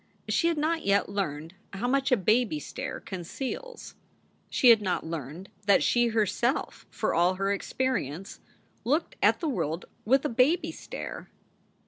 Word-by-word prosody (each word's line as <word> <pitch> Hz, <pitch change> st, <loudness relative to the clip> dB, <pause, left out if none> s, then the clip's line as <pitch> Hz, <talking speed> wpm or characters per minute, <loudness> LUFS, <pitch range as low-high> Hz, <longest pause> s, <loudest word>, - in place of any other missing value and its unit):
She 335 Hz, -, +2 dB
had 335 Hz, -2 st, +1 dB
not 320 Hz, +2 st, 0 dB
yet 200 Hz, 0 st, +2 dB
learned 165 Hz, -4 st, -3 dB, 0.2 s
how 210 Hz, +5 st, -2 dB
much 270 Hz, +1 st, +1 dB
a 250 Hz, -, +5 dB
baby 215 Hz, -3 st, +2 dB
stare -, -, -6 dB
conceals. 265 Hz, -, -6 dB, 0.6 s
She 255 Hz, -, +4 dB
had 225 Hz, -2 st, +7 dB
not 185 Hz, -5 st, -1 dB
learned 160 Hz, +3 st, -6 dB, 0.2 s
that 200 Hz, -, +5 dB
she 240 Hz, 0 st, +3 dB
her 220 Hz, -2 st, +2 dB
self, 240 Hz, +7 st, -2 dB
for -, -, -1 dB
all 175 Hz, +3 st, +3 dB
her 195 Hz, +1 st, 0 dB
experience, 195 Hz, -, -3 dB, 0.4 s
looked 290 Hz, +9 st, 0 dB
at -, -, +4 dB
the 330 Hz, -, -1 dB
world 170 Hz, -, -2 dB, 0.2 s
with 270 Hz, +6 st, +3 dB
a -, -, +4 dB
baby 260 Hz, +9 st, +2 dB
stare. -, -, -7 dB
215 Hz, 155 wpm, -28 LUFS, 185-265 Hz, 0.6 s, had